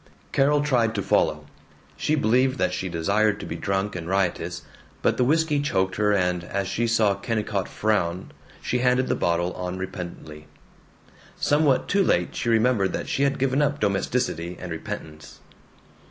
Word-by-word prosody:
Carol 145 +2 +3
tried 120 -6 +1
to 100 - -1
follow; 75 -3 +1 0.5
she 155 - 0
believed 130 0 +2
that - - 0
she 95 - -3
desired 100 +5 +1
to - - -6
be - - -5
drunk 95 +1 -2
and 85 -2 -5
riotous; 95 -2 -1 0.4
but - - +2
the - - +3
whisky 150 +2 +2
choked 95 -9 0
her 105 0 +2
and 90 -3 +1
as 100 +2 -3
she 115 +4 -1
saw 110 -3 +3
Kennicott 105 -3 -2
frown 95 -4 -1 0.3
she 125 - 0
handed 125 +1 +2
the - - +3
bottle 85 +1 0
on 90 0 -4
repentantly. 85 -5 -7 0.9
Somewhat 145 -3 +2
too 200 0 +3
late 90 - +1
she 120 - -2
remembered 115 -4 +2
that - - -3
she - - -1
had 140 0 +2
given 135 +2 +1
up 145 0 +1
domesticity 95 -4 -1
and 90 -1 -7
repentance. 80 -1 -7
105 Hz, 165 wpm, -24 LUFS, 90-125 Hz, 0.9 s, Carol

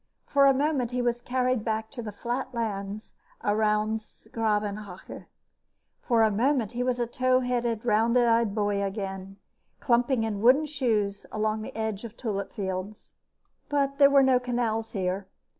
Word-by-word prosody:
For 280 -1 +4
a 275 - +6
moment, 275 -3 0
he 250 0 -1
was 240 0 0
carried 255 -2 0
back 220 -1 -2
to 255 - -6
the 215 -2 -6
flat 240 +5 -4
lands 210 -2 -4 0.3
around 215 +1 +1
's 215 - -19
Gravenhage. 210 -3 -3 0.8
For 230 -3 +3
a 220 - +3
moment 240 +1 +1
he 245 0 -3
was 250 0 0
a 240 - +1
tow 255 +2 +1
headed, 240 -2 -1
round 230 +2 +3
eyed 230 -3 +3
boy 205 -2 0
again, 195 -1 -4 0.4
clumping 240 0 +2
in 210 -2 -2
wooden 260 +7 +5
shoes 225 -9 -1
along 215 0 -1
the - - -8
edge 220 -2 -3
of 230 -2 -7
the - - -35
tulip 200 -5 -3
fields. 190 0 -5 0.6
But 275 -1 0
there 280 -1 +8
were 280 -1 +5
no 260 -1 +4
canals 235 -3 -2
here. 190 -1 -2
225 Hz, 165 wpm, -27 LUFS, 210-250 Hz, 0.8 s, there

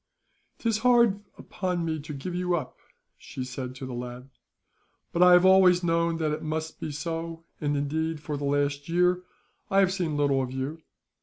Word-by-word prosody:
"'Tis 225 -2 0
hard 235 -4 +4 0.2
upon 180 -3 -3
me 160 -1 -2
to 150 +1 -8
give 150 +5 -5
you 180 0 0
up," 150 -7 -5 0.4
she 130 - -7
said 125 0 -6
to 130 - -7
the 130 - -6
lad; 125 +2 -7 0.8
"but 175 - -1
I 180 0 +8
have 180 +1 +6
always 185 -1 +6
known 170 0 +1
that 155 -2 0
it 155 +1 -3
must 160 +1 -4
be 155 - -4
so, 165 +2 -5 0.2
and 145 -1 0
indeed, 160 +3 -1
for 150 0 -4
the 145 0 -4
last 145 +1 0
year 180 +1 +2 0.5
I 195 - +1
have 190 -1 +3
seen 170 -6 -2
little 140 -2 +2
of 130 -1 -4
you. 135 +5 -4
160 Hz, 185 wpm, -27 LUFS, 145-180 Hz, 0.8 s, I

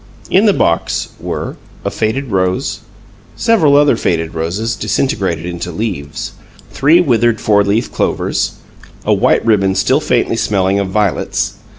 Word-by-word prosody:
In 200 +4 +4
the - - +6
box 85 - 0
were: - - -5 0.3
A - - -1
faded 120 +4 -2
rose. 95 +3 0 0.6
Several 200 -12 +3
other 145 -3 +5
faded 80 -6 -1
roses, 95 +8 -2
disintegrated 95 - -1
into 90 0 -5
leaves. 85 -6 -4 0.4
Three 150 +5 +4
withered 120 -8 +2
"four 105 -1 +3
leaf 105 +4 0
clovers." - - -1 0.5
A - - +3
white - - +2
ribbon 95 -4 +2
still 130 +7 +2
faintly 120 -5 0
smelling 100 -2 +1
of 100 - -1
violets. 100 -2 -1
105 Hz, 135 wpm, -15 LUFS, 95-130 Hz, 0.6 s, the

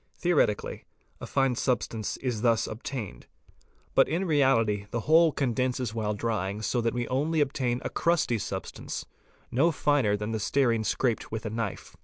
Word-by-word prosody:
Theoretically 160 - +1 0.3
a - - -7
fine 135 -2 +2
substance 120 -3 -1
is 125 -5 -3
thus 115 -2 +3
obtained. 110 -1 -6 0.7
But - - +4
in 170 +5 0
Pi - - -3
reality 115 -9 +2
the 120 - -2
whole 160 +5 +5
condenses 125 -3 -1
while 105 -2 -1
drying 105 -2 -2
so 120 +2 0
that 115 +1 0
we 120 -1 -1
only 150 +5 +1
obtain 130 -4 0
a - - 0
crusty 165 -8 +1
xz - - -5
substance, - - -5 0.5
no 150 +8 +3
finer 140 -9 +2
than 105 +2 -4
the 110 - -1
stearine 115 +1 +1
scraped 120 +1 0
with 110 0 -4
a 110 - -3
knife. 115 -3 -4
120 Hz, 170 wpm, -28 LUFS, 110-140 Hz, 0.7 s, whole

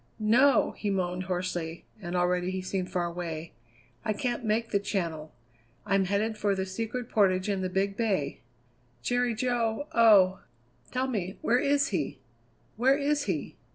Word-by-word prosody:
"No!" 240 +5 +4
he 210 - -2
moaned 185 -1 -1
hoarsely, 175 -2 -3 0.2
and 175 -1 -4
already 180 0 +1
he 185 0 -3
seemed 185 -1 -2
far 175 -1 0
away. 170 -2 -5 0.5
"I 215 - 0
can't 240 +3 -2
make 225 +1 0
the 200 - +3
Channel. 170 -6 -3 0.5
I'm 195 0 +2
headed 210 +3 -1
for 205 -1 +1
the 190 0 -2
Secret 225 +5 -4
Portage 185 -4 +2
and 195 -2 -1
the 185 - -1
Big 195 +2 0
Bay." 195 -12 -1 0.6
"Jerry 245 - +1
Jo! 235 +1 0
oh! 200 -5 +6 0.5
tell 255 +1 0
me, 200 -7 -3
where 245 +2 +3
is 280 +1 +2
he? 165 -9 -2 0.6
Where 265 +4 +4
is 290 0 0
he?" 175 -7 -3
200 Hz, 155 wpm, -28 LUFS, 180-230 Hz, 0.6 s, oh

